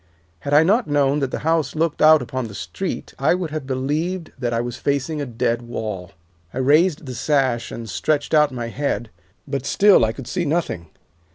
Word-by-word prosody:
Had 140 - -5
I 150 - +7
not 215 +8 +2
known 145 -1 +2
that 135 -2 -1
the - - -4
house 160 -3 +1
looked 160 0 0
out 155 0 +7
upon 130 -3 -4
the 105 - -10
street 90 - -5
I 140 +5 +3
would 180 -4 -4
have 155 -4 -4
believed 155 +7 -2
that 120 -2 -1
I 115 - 0
was 120 0 -3
facing 145 +2 -1
a 140 - -3
dead 115 0 -1
wall. 110 -6 -5 0.4
I - - -8
raised 150 +5 +3
the 130 - -6
sash 130 -2 0
and 115 -1 -6
stretched 145 - -1
out 150 -2 +5
my 120 -2 -4
head, 125 -3 -2 0.4
but 135 -2 -3
still 200 - +5
I 110 - +2
could 130 +2 -9
see 180 +8 -2
nothing. 150 - -1
140 Hz, 200 wpm, -21 LUFS, 120-155 Hz, 0.4 s, I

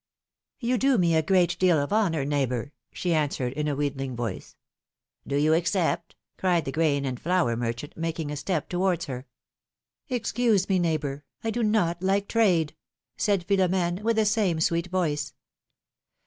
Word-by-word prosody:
'^You 245 0 +1
do 270 0 +3
me 170 -3 +3
a 160 - +4
great 175 0 +2
deal 180 -3 +4
of 145 +5 -1
honor, 170 -10 +1
neighbor," 140 -2 -1 0.2
she 175 -2 -1
answered, 140 -5 0
in 150 +1 -2
a 145 - 0
wheedling 135 -2 -2
voice. 120 -1 -5 0.7
Do 140 - -1
you 150 +2 +3
accept? 170 0 0
" - - -54
cried 175 -4 +2
the 135 - -3
grain 145 -2 +1
and 125 -2 -3
flour 175 -9 +1
merchant, 120 +4 -4
making 160 -2 -3
a - - -3
step 150 +1 -2
towards 180 -2 0
her. 130 -2 -6 0.8
Excuse 235 -4 +1
me, 190 -2 +2
neighbor, 150 -4 -1 0.2
I 225 - 0
do 240 - -2
not 210 -6 +1
like 195 +1 +1
trade," 180 -10 +2 0.4
said 200 -4 +1
Philo 190 +1 +2
m^ne, 180 0 0
with 230 +1 +1
the 220 -1 +3
same 205 -6 +1
sweet 170 +2 +1
voice. 170 -5 -1
170 Hz, 170 wpm, -26 LUFS, 145-190 Hz, 0.8 s, a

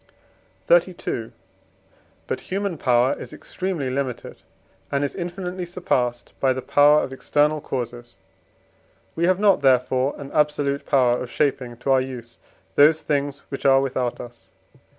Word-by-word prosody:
XXXII. - - +1 0.9
But - - -3
human 195 -4 -2
power 125 +1 +3
is - - -9
extremely 175 -9 -4
limited, 130 -2 -4 0.5
and 140 0 0
is 140 - -2
infinitely 180 0 -5
surpassed 125 -9 -2
by 130 -1 +2
the 130 - -4
power 145 +1 +5
of 130 - -5
external 150 +3 +1
causes; 120 -2 -5 1.0
we 170 - +1
have 185 +1 +2
not, 200 -6 +4
therefore, 130 0 +2
an 140 -1 -9
absolute 145 -2 0
power 125 -3 +3
of 125 - -6
shaping 125 -4 -1
to 135 +3 -1
our 130 -1 +4
use 125 -3 -8 0.3
those 155 +2 +5
things 140 -1 -2
which 135 - -6
are 135 -1 +5
without 130 -2 -2
us. 120 -1 -11
140 Hz, 140 wpm, -23 LUFS, 125-155 Hz, 1.0 s, power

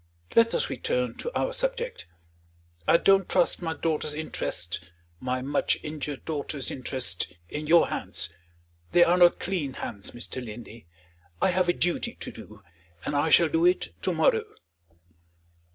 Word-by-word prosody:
Let 230 0 +5
us - - +1
return 125 -2 -1
to 480 - -4
our - - 0
subject. - - -2 0.8
I - - +7
don't 195 +1 +4
trust 180 -1 +3
my 165 -2 -2
daughter's 155 -1 -1
interests 90 - -3 0.3
my 130 +2 -2
much 145 +2 +1
injured 150 -2 -5
daughter's 145 -3 -2
interests 125 -8 -1 0.2
in 150 0 -5
your 170 +1 +5
hands. 85 -1 -1 0.6
They 175 - +7
are 175 - +4
not 175 -1 +5
clean 170 -8 -2
hands, 100 -5 -4
Mr. 125 +1 -5
Linley. 115 -2 -10 0.5
I - - +3
have 180 0 +1
a - - +4
duty 175 0 0
to - - -6
do; - - -13 0.4
and 145 - -2
I 145 +3 +2
shall 170 +2 +6
do 165 +1 +1
it 175 - +2
to 185 - 0
morrow." 160 -9 +2
155 Hz, 150 wpm, -27 LUFS, 125-175 Hz, 0.8 s, I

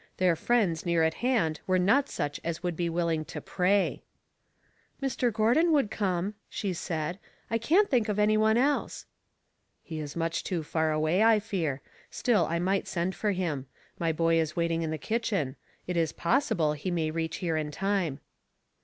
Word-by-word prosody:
Their 180 -2 +3
friends 190 -5 +1
near 170 -2 +2
at 160 0 +2
hand 225 -12 +1
were 185 -1 +3
not 205 +10 +3
such 145 0 -3
as 170 +1 -4
would 175 -2 -1
be 170 +1 -1
willing 165 -2 0
to - - -6
pray. 195 +2 +1 0.5
" - - -39
Mr. 260 -3 0
Gordon 235 +11 +3
would 275 -8 +2
come," 190 -1 -1 0.2
she 195 -3 -2
said. 165 +1 -3
" - - -34
I 230 - +1
can't 365 - +4
think 235 -6 +1
of 210 - -1
any 210 +1 +3
one 220 +1 +3
else." 280 +4 0 0.8
"He 160 -2 -6
is 145 -2 -6
much 165 0 -1
too 175 -4 -2
far 160 +1 0
away, 155 +5 +1
I 225 -1 +6
fear; 170 -10 -2 0.3
still 180 +3 +2
1 170 +1 -1
might 195 +1 0
send 175 +1 -1
for 210 +1 -1
him. 155 -8 -2 0.3
My 165 -1 +1
boy 165 +1 +2
is 155 -1 -1
waiting 170 -1 0
in 160 - -2
the 160 - -2
kitchen; 200 - -1 0.3
it 180 - -3
is 165 -2 +1
possible 170 - +1
he 150 +5 -4
may 165 -3 0
reach 160 0 -2
here 170 -3 -1
in 155 -1 -1
time." 190 -3 -1
175 Hz, 190 wpm, -28 LUFS, 160-210 Hz, 0.8 s, I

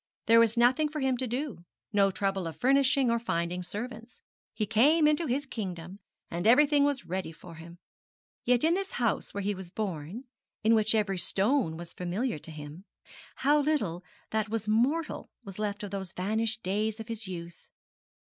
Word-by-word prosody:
There 230 0 +7
was 230 0 +3
nothing 255 +6 +4
for 305 0 -4
him 265 -2 +1
to 260 +1 -2
do, 245 - -4 0.3
no 200 -1 +4
trouble 195 -2 -1
of 165 - -7
furnishing, 270 -1 +3
or 235 - +2
finding 175 -5 -2
servants. 225 +5 -7 0.3
He 215 0 -2
came 285 +9 +4
into 305 +2 +2
his 275 +3 0
kingdom, 185 -6 -6 0.3
and 175 +4 -1
everything 285 +4 +6
was 285 -3 -1
ready 185 -1 -3
for 165 +1 -12
him. 165 +2 -11 0.7
Yet 245 -1 +3
in 325 +2 +4
this 390 +1 -2
house 235 -3 0
where 200 - -4
he 205 +1 0
was 190 -2 -8
born, 190 - -4 0.4
in 220 +1 +5
which 220 0 +3
every 195 -4 +1
stone 195 - +1
was 170 +1 -9
familiar 180 - -2
to 165 - -6
him, 150 +3 -9 0.5
how 295 +2 +3
little 215 - 0 0.3
that 220 -1 0
was 220 -1 -2
mortal 260 +10 +1
was 195 -2 -9
left 210 0 -2
of 205 - -5
those 190 -2 -5
vanished 220 +4 -1
days 210 +4 -1
of 220 - -7
his 225 -3 -4
youth! 170 -2 -8
215 Hz, 180 wpm, -29 LUFS, 185-255 Hz, 0.7 s, There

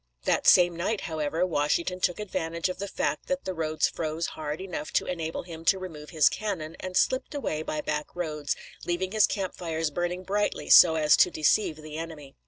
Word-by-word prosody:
That - - +1
same 175 -1 +6
night, 195 +5 -1
however, 160 0 -1
Washington 170 +3 0
took 180 +1 0
advantage 170 -4 -2
of 185 - -5
the 200 - -3
fact - - -2
that 275 0 -2
the 185 - -2
roads 155 -2 0
froze 160 +1 -3
hard 150 +1 -5
enough 180 -5 -5
to - - +2
enable 165 -3 -3
him 165 -2 -9
to 195 - +4
remove 160 -5 -8
his 155 -4 +4
cannon, 180 -7 -3
and 185 -1 -3
slipped 260 +3 +1
away 155 - -2
by 155 -1 -3
back 150 0 -3
roads, 150 -4 -2 0.3
leaving 180 +2 -2
his 215 -1 +4
camp 190 -3 -3
fires 165 -3 -2
burning 175 +3 -2
brightly 205 +2 -1
so 165 -2 +9
as 150 -1 +5
to - - +5
deceive 160 +2 +2
the 155 0 -8
enemy. 155 -4 -8
170 Hz, 195 wpm, -27 LUFS, 155-185 Hz, 0.3 s, so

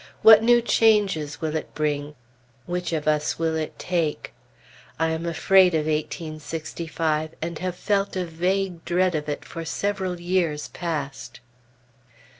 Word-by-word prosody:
What 220 -1 +9
new 240 +1 +4
changes 200 -11 +2
will 160 -1 -2
it 155 - -5
bring? 150 -1 -2 0.5
Which 180 0 -3
of 155 -2 -2
us 150 -1 +1
will 165 -1 0
it 155 -1 -4
take? 170 -4 -2 0.7
I 160 0 +2
am 160 +1 -3
afraid 180 +2 +4
of 155 -1 0
eighteen 155 0 -3
sixty 165 +2 -6
five, 155 -1 -1
and 165 0 -4
have 180 -1 -3
felt 200 +1 0
a 185 -1 -1
vague 180 +1 -1
dread 180 +1 +1
of 150 -1 -3
it 145 - -4
for 165 - -7
several 190 +1 -2
years 175 -4 -1
past. 140 -7 -5
165 Hz, 150 wpm, -24 LUFS, 155-185 Hz, 0.7 s, What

